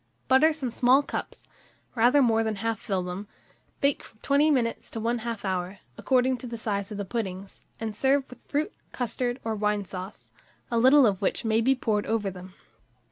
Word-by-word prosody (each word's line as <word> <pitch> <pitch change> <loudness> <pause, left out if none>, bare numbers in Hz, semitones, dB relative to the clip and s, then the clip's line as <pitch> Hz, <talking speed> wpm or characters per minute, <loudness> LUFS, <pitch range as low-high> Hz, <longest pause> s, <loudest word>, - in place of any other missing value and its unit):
Butter 265 +5 +5
some 280 -6 -4
small 255 +4 +4
cups, - - -6 0.5
rather 250 +4 +4
more 225 -2 +3
than 220 -1 -1
half 225 +1 -2
fill 190 -3 -2
them; 180 +3 -6 0.5
bake 280 0 +2
from 220 - -16
20 285 +2 +3
minutes 245 -6 0
to 225 - -6
1/2 230 -1 -2
hour, 185 0 -2 0.2
according 255 - +2
to 250 - -8
the 235 0 -5
size 200 -2 -3
of 210 - -5
the 205 - -3
puddings, 195 -3 -5 0.2
and 220 -2 -4
serve 270 +4 +2
with 250 - -14
fruit, 300 +8 -2 0.2
custard, 245 +1 -2
or 225 - -1
wine 210 -1 0
sauce, 185 +2 -9 0.4
a 235 - +2
little 265 +3 +7
of 200 -4 +1
which 200 - -1
may 220 0 +2
be 265 +3 +3
poured 215 -5 -1
over 215 -3 0
them. 185 +1 -11
225 Hz, 190 wpm, -27 LUFS, 205-255 Hz, 0.5 s, little